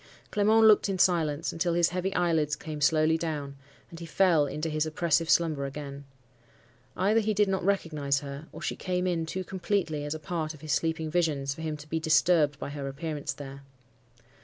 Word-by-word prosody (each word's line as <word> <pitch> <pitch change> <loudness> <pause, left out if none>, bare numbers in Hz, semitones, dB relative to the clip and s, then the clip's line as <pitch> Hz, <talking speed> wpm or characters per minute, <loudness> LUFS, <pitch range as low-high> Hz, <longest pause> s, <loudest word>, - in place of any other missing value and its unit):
Clement 215 +2 +4
looked 215 -1 +5
in 195 - -1
silence, 165 -4 +1
until 170 0 0
his 175 0 +3
heavy 185 +1 -2
eyelids 160 -4 +1
came 150 0 -7
slowly 155 +2 +3
down, 150 -4 -4 0.4
and 165 - -10
he 170 - -8
fell 165 -4 +3
into 150 +3 -3
his 155 0 -1
oppressive 165 +1 +1
slumber 155 -4 +2
again. 140 0 -8 0.9
Either 205 +4 +3
he 215 -1 0
did 210 +1 +3
not 190 -1 -1
recognize 155 -8 0
her, 140 +2 -8
or - - -10
she - - -2
came 180 -1 -2
in 170 -3 -1
too 185 +3 -3
completely 180 -5 -2
as 145 +1 -3
a - - -6
part 155 0 -4
of 145 - -17
his 155 -3 -2
sleeping 160 0 -1
visions 150 -6 0
for 160 - -10
him 155 -1 -3
to 150 +1 -12
be 160 +1 -2
disturbed 160 -2 +3
by - - -6
her 140 -1 -5
appearance 150 +1 -4
there. 140 -1 -9
160 Hz, 195 wpm, -28 LUFS, 150-175 Hz, 0.9 s, looked